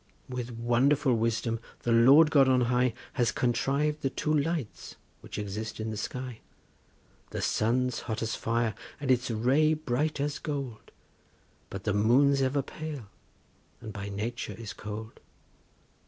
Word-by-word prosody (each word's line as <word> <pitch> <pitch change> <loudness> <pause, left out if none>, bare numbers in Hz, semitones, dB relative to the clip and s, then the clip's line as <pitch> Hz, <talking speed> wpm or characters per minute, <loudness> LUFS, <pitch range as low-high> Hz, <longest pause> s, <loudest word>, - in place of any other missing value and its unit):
With 125 -1 -4
wonderful 125 +4 +2
wisdom 115 0 0 0.2
the 120 - 0
Lord 135 +7 +7
God 140 -3 +6
on 130 -1 +4
high 125 0 +2 0.2
Has 120 -2 +2
contriv'd 140 +5 0
the 135 - +1
two 155 +3 -1
lights 150 -4 -2 0.2
which - - -9
exist 105 +2 -4
in 110 0 -3
the - - -4
sky; 125 +2 -5 0.9
The - - -4
sun's 125 +3 +1
hot 110 -2 -3
as 110 - -2
fire, 115 -1 0 0.3
and 140 -3 0
its 125 0 +2
ray 135 +8 +3
bright 150 0 -1
as 145 +1 -1
gold, 140 -7 -5 0.8
But 95 -1 -6
the 105 - 0
moon's 135 +7 +4
ever 135 +1 +1
pale, 145 -7 -7 0.7
and 110 -2 -8
by 100 0 -5
nature 105 +2 -4
is 110 -3 -7
cold. 110 +1 -7
125 Hz, 145 wpm, -29 LUFS, 110-140 Hz, 0.9 s, Lord